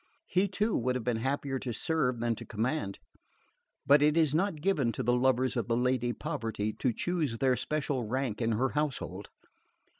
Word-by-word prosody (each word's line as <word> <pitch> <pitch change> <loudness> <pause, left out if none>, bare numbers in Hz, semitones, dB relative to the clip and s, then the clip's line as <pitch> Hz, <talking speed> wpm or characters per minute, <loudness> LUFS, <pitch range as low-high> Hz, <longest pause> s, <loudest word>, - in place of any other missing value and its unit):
He 185 - +2
too 210 +3 0
would 125 +1 0
have 125 - -2
been 120 -1 0
happier 135 +2 -1
to 125 -2 -4
serve 130 -4 0
than 120 0 +1
to - - -7
command! 110 -1 -2 0.9
But 140 +1 +6
it 150 +2 +4
is 155 -4 +3
not 170 0 +1
given 150 -8 +1
to - - -3
the 120 - +2
lovers 130 +1 +2
of 120 - -1
the 115 -1 +1
Lady 125 -1 +1
Poverty 110 -3 -3
to 125 - 0
choose 155 -2 -1
their 130 +1 +3
special 140 0 -2
rank 125 -2 -2
in 115 0 +1
her 130 +5 +1
household. 130 -10 -3
130 Hz, 185 wpm, -30 LUFS, 120-150 Hz, 0.9 s, But